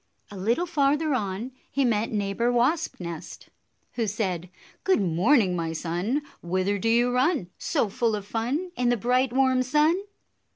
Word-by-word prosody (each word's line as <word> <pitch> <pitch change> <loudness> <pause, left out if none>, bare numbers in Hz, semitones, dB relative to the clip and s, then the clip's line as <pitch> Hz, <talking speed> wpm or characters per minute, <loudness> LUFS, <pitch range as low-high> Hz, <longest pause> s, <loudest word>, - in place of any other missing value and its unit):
A - - -8
little 230 - 0
farther 300 -1 +1
on 215 +1 -2 0.2
he 275 -1 +1
met 225 -2 +1
Neighbor 210 +3 0
Wasp 260 +7 +1
nest, 170 -3 -8 0.4
who 230 -3 -1
said, 185 -4 -2 0.3
"Good 380 - +3
morning, 190 - +3
my 165 -1 -2
son! 180 - -2 0.2
Whither 185 +3 0
do 225 - 0
you 240 +2 +3
run, 255 - +1
So - - 0
full 225 +2 0
of 205 -1 -6
fun, 255 - -2
In 250 -1 +1
the 245 - +2
bright, 250 +3 +1
warm 260 0 +3
sun?" 300 +8 +2
235 Hz, 160 wpm, -26 LUFS, 195-265 Hz, 0.4 s, Good